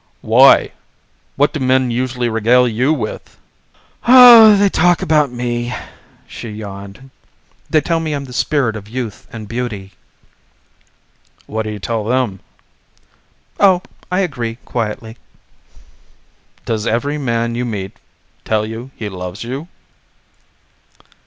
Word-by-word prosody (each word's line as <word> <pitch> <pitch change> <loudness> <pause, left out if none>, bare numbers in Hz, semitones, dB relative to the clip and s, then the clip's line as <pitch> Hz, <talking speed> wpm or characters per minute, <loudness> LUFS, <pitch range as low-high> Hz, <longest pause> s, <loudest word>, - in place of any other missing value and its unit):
"Why? - - +5 0.6
What 145 +2 +1
do 155 - -3
men 130 -1 +1
usually 125 0 -2
regale 120 +3 +3
you 125 +5 0
with?" 120 -9 -5 0.7
"Oh, 240 -4 +9
they 200 0 +3
talk 175 -2 +2
about 150 -4 +2
me," 120 0 -3 0.5
she 115 - -9
yawned. 105 +4 -10 0.6
"They 155 - +3
tell 165 0 -1
me 160 -2 -3
I'm 140 -1 -4
the 125 - -11
spirit 135 -5 0
of 105 -1 -9
youth 120 -3 -6
and 110 -2 -8
beauty." 110 -5 -5 1.5
"What 110 0 -4
do - - -4
you 105 - -5
tell 110 +2 -3
them?" 120 -5 -1 1.2
"Oh, 190 -2 +4 0.3
I 180 +2 +1
agree 120 -10 -3
quietly." 110 0 -4 1.5
"Does 110 -1 -2
every 145 +6 -1
man 115 -3 -1
you 120 +1 -2
meet 100 -5 -5 0.5
tell 110 -1 0
you 115 +4 -7
he 110 - -6
loves 90 +1 -7
you?" 135 +7 -6
120 Hz, 125 wpm, -17 LUFS, 110-140 Hz, 1.5 s, Oh